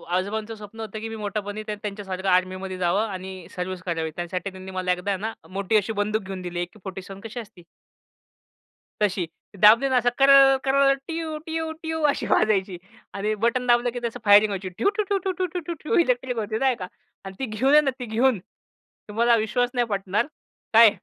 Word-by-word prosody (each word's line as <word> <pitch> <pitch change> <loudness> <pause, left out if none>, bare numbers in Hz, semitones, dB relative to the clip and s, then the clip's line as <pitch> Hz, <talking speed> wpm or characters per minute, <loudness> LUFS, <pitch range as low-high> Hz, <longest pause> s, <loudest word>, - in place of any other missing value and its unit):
आजोबांचं 215 +4 -2
स्वप्न 215 +1 -12
होतं 215 -1 -5
की 225 - -5
मी 225 - -6
मोठेपणी 205 0 -4
त्या 210 - -2
त्यांच्यासारखं 195 -2 -5
आर्मीमध्ये 185 +1 0
जावं 185 +5 +1
आणि 185 -2 -7
सर्व्हिस 180 0 -4
करावी. 165 -3 -2
त्यासाठी 180 +3 -3
त्यांनी 190 0 -10
मला 185 -1 -1
एकदा 185 +3 -2
ना, 220 +4 -4 0.2
मोठी 200 +3 +1
अशी 215 +2 0
बंदूक 215 +1 0
घेऊन 190 -1 -6
दिली, 175 -1 -5
अेके-फोर्टी 190 +1 -6
सेव्हन 195 +1 -10
कशी 225 +2 -7
असती. 200 -6 -11 1.4
तशी. 195 -3 +1 0.4
दाबली 230 +6 +8
ना 260 - +3
असं 245 - +4
कर-कर-ट्यू-ट्यू-ट्यू 305 +4 +2
अशी - - -1
वाजायची 195 -4 +2 0.4
आणि 210 +2 -1
बटन 250 +2 +1
दाबलं 240 0 +4
की - - -2
त्या 230 - -4
फायरिंग 205 +1 +7
वहायची 190 -1 -4
ड्यू-ठू-टू-टू-टू-टू 365 - -1
इलेक्ट्रिक 250 -5 +1
होती 215 0 -2
नाही 265 -2 +2
का 185 -5 -6 0.4
आणि 195 0 -8
ती 265 - -1
घेऊन 240 +5 +1
आहे 300 - +8
ना 280 - +1
ती 250 - -4
घेऊन 235 0 +2 0.7
तुम्हाला 235 +3 +3
विश्वास 235 +3 +1
नाही 245 -1 +1
पटणार 200 +1 0 0.5
काय? 225 0 +9
215 Hz, 165 wpm, -24 LUFS, 190-255 Hz, 1.4 s, काय